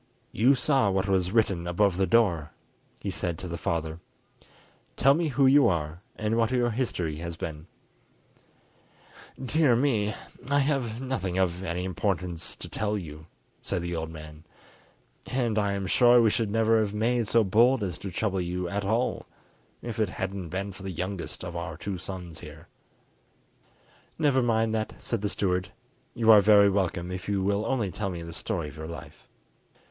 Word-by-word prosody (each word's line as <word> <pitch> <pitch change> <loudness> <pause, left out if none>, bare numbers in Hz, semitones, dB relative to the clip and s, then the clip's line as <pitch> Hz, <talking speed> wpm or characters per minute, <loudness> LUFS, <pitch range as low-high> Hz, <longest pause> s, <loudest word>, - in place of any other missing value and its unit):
"You 125 +7 +4
saw 135 -4 +2
what 95 0 0
was 95 -2 +1
written 100 -6 +1
above 90 +2 +2
the 95 +1 +1
door," 90 -10 +2 0.5
he - - -4
said 85 -2 -2
to 90 - -6
the 85 - -4
father. 80 -1 -2 1.0
"Tell 135 +2 +5
me 165 +2 0
who 140 -1 +2
you 135 -1 +6
are 80 -2 -2
and 110 +1 -1
what 115 -1 +2
your 120 -2 +1
history 95 -10 -2
has 85 +1 -5
been." 80 0 -6 1.7
"Dear 135 -1 +3
me, 115 -5 +1 0.3
I 140 - +3
have 135 -5 0
nothing 120 -9 -3
of 90 -1 +1
any 90 -1 -3
importance 90 -2 -2
to - - -7
tell 105 0 -2
you," 80 -4 -9 0.3
said 85 - -3
the 85 0 -3
old 80 -1 -3
man, 75 -1 -11 0.9
"and 120 -4 +1
I 100 -1 0
am 100 -1 -3
sure 120 +6 +5
we 115 -2 +4
should 115 -3 0
never 115 +1 +3
have 105 -1 -1
made 115 +1 +1
so 115 +2 +4
bold 115 +5 +4
as 90 -5 -4
to 100 - -5
trouble 95 +1 -1
you 90 +1 -3
at 100 +3 -2
all 115 +5 -1 0.6
if 120 -1 -5
it 110 - +2
hadn't 95 -2 -4
been 95 +3 -3
for 95 - -11
the 95 - -5
youngest 90 +1 -5
of 85 -1 -6
our 85 -2 -5
two 95 +1 -5
sons 90 -2 -7
here." 75 0 -12 1.5
"Never 145 -4 +3
mind 115 -2 +1
that," 110 -1 -2
said 115 -4 -3
the 105 - -1
steward; 90 -3 -1 0.5
"you 115 -1 +5
are 105 -2 +9
very 100 0 +6
welcome 90 -2 -1
if 90 +1 -5
you 100 -2 0
will 100 +2 0
only 115 -8 0
tell 100 +1 -3
me 85 -2 -5
the 85 0 -8
story 85 -1 -3
of 75 +1 -11
your 80 0 -6
life." 85 - -10
100 Hz, 180 wpm, -27 LUFS, 85-115 Hz, 1.7 s, are